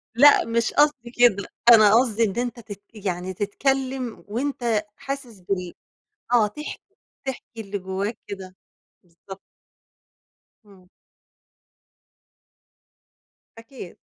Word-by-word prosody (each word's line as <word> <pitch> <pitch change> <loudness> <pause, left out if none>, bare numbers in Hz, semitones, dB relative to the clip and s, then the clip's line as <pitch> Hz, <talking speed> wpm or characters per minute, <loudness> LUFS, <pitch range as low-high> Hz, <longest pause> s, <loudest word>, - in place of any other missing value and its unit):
لأ 285 +1 +7
مش 230 0 0
قصدي 290 -5 +2
كده، 240 -6 +3 0.2
أنا 215 -2 +8
قصدي 230 -2 +3
إن 205 0 -1
أنت 245 -1 -2
تت 205 -3 -10 0.2
يعني 180 0 -2
تتكلّم 260 +4 -2
وأنت 235 -2 -1
حاسس 275 -6 -7
بال 180 -1 -3 0.6
آه 235 -3 +5
تحكي، 300 +9 -7 0.4
تحكي 250 -3 -7
اللي 200 -1 -4
جوّاك 190 +4 -4
كده، 190 -2 -8 0.5
بالضبط. 185 +3 -13 1.2
إمم. 190 -3 -19 2.7
أكيد. 230 -5 -11
225 Hz, 100 wpm, -24 LUFS, 195-250 Hz, 2.7 s, أنا